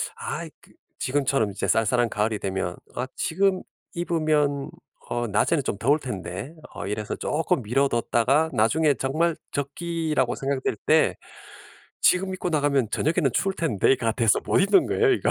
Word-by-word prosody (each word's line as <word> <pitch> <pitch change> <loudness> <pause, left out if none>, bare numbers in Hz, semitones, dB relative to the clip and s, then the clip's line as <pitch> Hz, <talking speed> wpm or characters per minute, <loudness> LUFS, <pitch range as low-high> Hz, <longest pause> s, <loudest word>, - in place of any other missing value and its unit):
아 - - -5
이 - - -10
그 - - -21 0.3
지금처럼 135 -5 0
이제 100 - -3
쌀쌀한 115 +2 +2
가을이 105 0 -1
되면 95 -2 -3 0.2
'아 125 - -2
지금 190 +2 +1 0.3
입으면 155 -5 0 0.4
어 120 0 -1
낮에는 125 +8 +1
좀 105 - -2
더울 140 +9 +2
텐데.' 105 - -6 0.2
어 - - -6
이래서 105 +1 -3
쪼끔 150 -4 -1
미뤄 135 +6 +1
뒀다가 130 +6 +2
나중에 140 +7 +3
정말 155 +6 0 0.2
적기라고 150 -2 -1
생각될 135 -3 -2
때 - - +4 0.9
'지금 190 +1 +3
입고 180 -1 -3
나가면 145 -6 +1
저녁에는 155 0 +1
추울 195 +9 0
텐데.'가 120 - +1
돼서 115 -3 +2
못 - - +2
입는 195 0 +4
거예요, 435 -2 +2
이거. - - +1
140 Hz, 320 characters per minute, -25 LUFS, 115-160 Hz, 0.9 s, 때